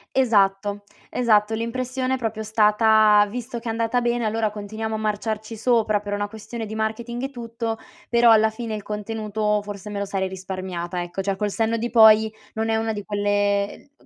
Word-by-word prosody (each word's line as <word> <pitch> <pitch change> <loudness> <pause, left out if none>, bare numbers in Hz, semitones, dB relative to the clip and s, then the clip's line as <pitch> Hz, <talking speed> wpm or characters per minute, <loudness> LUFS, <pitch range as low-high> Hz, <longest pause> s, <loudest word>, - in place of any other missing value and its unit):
Esatto, 205 -4 +2 0.3
esatto. 220 -3 +2
L'impressione 255 +3 -2
è - - -3
proprio 225 -3 -3
stata: 215 -1 +5
visto 240 +2 -5
che 230 0 -6
è - - +1
andata 230 +2 0
bene, 240 -1 0
allora 220 0 0
continuiamo 215 +1 -5
a - - -1
marciarci 215 +1 -3
sopra 220 -2 +2
per 205 0 -6
una 205 0 -1
questione 220 +2 -7
di 220 +1 -7
marketing 230 +3 -3
e 270 - -2
tutto, 230 -2 -4 0.3
però 235 0 +5
alla 220 -1 +6
fine 220 0 -5
il 210 - -6
contenuto 210 0 -2
forse 205 0 -8
me 205 -1 -4
lo 200 - -1
sarei 195 -1 -2
risparmiata, 185 -2 -5
ecco. 175 +2 -4
Cioè, 195 0 -2
col 210 0 -1
senno 225 +2 0
di 235 +1 -2
poi, 220 -2 +7 0.3
non 220 0 -1
è 225 - +1
una 225 0 0
di 205 -1 -5
quelle 205 +3 0
220 Hz, 190 wpm, -23 LUFS, 205-230 Hz, 0.3 s, poi